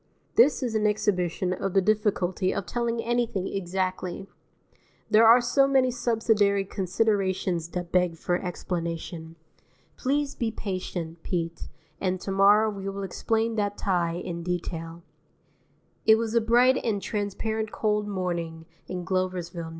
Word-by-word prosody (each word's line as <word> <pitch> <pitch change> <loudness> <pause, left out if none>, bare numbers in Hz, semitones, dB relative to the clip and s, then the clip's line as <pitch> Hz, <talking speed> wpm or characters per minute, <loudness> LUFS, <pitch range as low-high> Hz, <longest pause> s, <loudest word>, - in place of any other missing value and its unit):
This 265 +3 +4
is 240 -3 -2
an 215 -1 +2
exhibition 185 -4 0
of 190 0 -3
the - - +7
difficulty 195 -3 +1
of 200 - -3
telling 235 +1 -2
anything 235 -5 0
exactly. 185 0 -3 0.9
There 225 +1 +7
are 235 +2 +8
so 270 +3 +3
many 265 -2 +3
subsidiary 220 -4 +2
considerations 190 -3 0
that 175 0 -5
beg 180 -2 +2
for 175 +2 0
explanation. 170 -2 -4 0.6
Please 285 +1 0
be 230 - -1
patient, 185 -6 -5
Pete, 170 -2 -3 0.3
and 185 -1 -1
to 195 - -4
morrow 205 +3 +5
we 195 -1 -5
will 195 0 -5
explain 225 +4 -1
that 205 -1 -1
tie 175 -4 0
in 175 -1 -5
detail. 170 -1 -4 1.0
II 220 - +9
It - - +7
was 225 0 -2
a 235 - +4
bright 245 +3 +4
and 215 -3 0
transparent 215 +2 -3
cold 210 -1 0
morning 170 -4 -3 0.2
in 180 -1 -5
Gloversville, 180 -2 -2
N. - - -7
195 Hz, 140 wpm, -26 LUFS, 180-220 Hz, 1.0 s, II